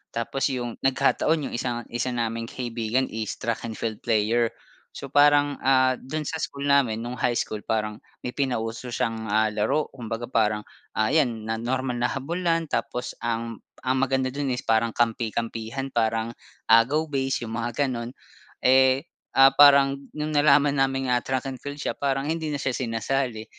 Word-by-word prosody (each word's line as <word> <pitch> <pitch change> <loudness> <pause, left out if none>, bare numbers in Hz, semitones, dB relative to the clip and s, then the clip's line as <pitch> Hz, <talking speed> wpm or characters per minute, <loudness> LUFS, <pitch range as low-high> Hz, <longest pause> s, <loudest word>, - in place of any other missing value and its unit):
tapos 115 +4 -1
yung 120 -3 -4
nagkataon 145 +3 +1
yung - - -8
isang, 120 0 -2
isa 120 +2 -1
naming 115 0 -2
kaibigan 120 +1 -1
is 110 -1 -3
track 115 0 -3
and 110 - -6
field 110 -2 -4
player. 115 +1 +2 0.5
So, - - -6
parang, 145 0 +4
ah, 130 -1 +4
dun 155 +4 -4
sa 160 - -3
school 140 0 -4
namin 140 -6 +3
nung 120 - -4
high 120 -1 +1
school 105 -1 -3
parang 105 -1 -2 0.3
may 125 - -2
pinauso 125 -3 -2
siyang, 115 -1 -2
ah, 110 +1 +2
laro 135 +9 0
kumbaga 115 -2 -5
parang, 105 -2 +1 0.3
ah, 110 +2 +2
iyan 120 -8 +2
na 110 0 -2
normal 125 0 -1
na 120 - +1
habulan 165 +4 -1
tapos 125 0 -2
ang 115 -1 -3 0.2
ang 130 0 +1
maganda 135 -1 +1
dun 140 -1 -2
is 125 - -1
parang 115 +1 +2
kampi-kampihan 115 +2 -2
parang 115 0 0 0.3
agaw 120 +8 +5
base 135 -3 -1
yung 110 - -6
mga 120 +4 -1
ganun, 120 -2 -4 0.6
eh, 130 +2 +5 0.3
ah, 135 0 +8
parang 140 -1 +7 0.2
nung 155 0 -2
nalaman 145 -1 +5
naming, 135 -1 +1
ah, 125 -1 +2
track 130 +1 -2
and 135 -2 -6
field 145 0 -6
siya 150 - -2
parang 135 0 -1
hindi 160 0 -2
na 145 - -2
siya 135 -2 -2
sinasali 120 -1 -2
125 Hz, 170 wpm, -25 LUFS, 115-135 Hz, 0.6 s, ah